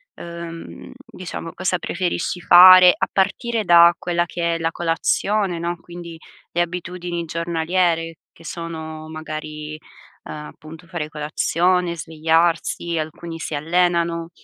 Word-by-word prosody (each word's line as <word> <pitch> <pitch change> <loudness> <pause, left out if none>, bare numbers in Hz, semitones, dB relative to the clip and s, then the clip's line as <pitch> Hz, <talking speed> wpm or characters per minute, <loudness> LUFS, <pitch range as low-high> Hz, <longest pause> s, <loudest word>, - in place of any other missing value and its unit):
uhm, 170 -1 -9
diciamo, 170 -2 -8
cosa 185 0 -1
preferisci 180 0 -3
fare 180 +1 +9
a - - 0
partire 215 +3 0
da 170 0 +7
quella 175 -1 -1
che 170 0 -2
è - - -4
la 165 0 -1
colazione, 175 +3 0
no, 170 0 -3
quindi 170 -1 -10 0.3
le 175 - +1
abitudini 175 0 -4
giornaliere 165 0 -1 0.2
che 165 - -18
sono 160 -2 -7
magari, 155 -1 -7 0.5
uhm, - - -9
appunto 155 +2 -11
fare 165 -5 -5
colazione, 170 +4 0
svegliarsi, 165 +2 0
alcuni 165 +2 -5
si 155 - -5
allenano, 170 +1 0
170 Hz, 120 wpm, -21 LUFS, 160-175 Hz, 0.5 s, fare